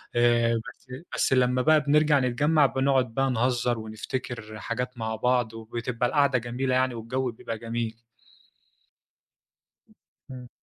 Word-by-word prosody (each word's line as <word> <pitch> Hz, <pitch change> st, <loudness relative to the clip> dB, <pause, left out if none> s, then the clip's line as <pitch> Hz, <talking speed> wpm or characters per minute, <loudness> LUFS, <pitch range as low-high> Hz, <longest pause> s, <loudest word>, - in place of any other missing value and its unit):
آآ، 120 Hz, -1 st, +3 dB, 0.2 s
بس -, -, -30 dB, 0.3 s
بس -, -, +1 dB
لمّا 125 Hz, 0 st, +3 dB
بقى 155 Hz, +3 st, +4 dB
بنرجَع 150 Hz, 0 st, +3 dB
نتجمَّع، 145 Hz, +5 st, +3 dB
بنقعد 130 Hz, -3 st, +1 dB
بقى 135 Hz, +2 st, +1 dB
نهزِر 120 Hz, 0 st, 0 dB
ونفتكر 110 Hz, 0 st, -6 dB
حاجات 125 Hz, +4 st, -4 dB
مع 110 Hz, -1 st, -3 dB
بعض، 120 Hz, 0 st, +1 dB
وبتبقى 115 Hz, +2 st, -3 dB
القعدة 140 Hz, -3 st, +3 dB
جميلة 125 Hz, +2 st, -2 dB
يعني 130 Hz, 0 st, +2 dB
والجو 125 Hz, +3 st, -2 dB
بيبقى 115 Hz, 0 st, -6 dB
جميل. 115 Hz, 0 st, -4 dB, 2.3 s
إمم. 125 Hz, -1 st, -9 dB
125 Hz, 125 wpm, -26 LUFS, 115-130 Hz, 2.3 s, بقى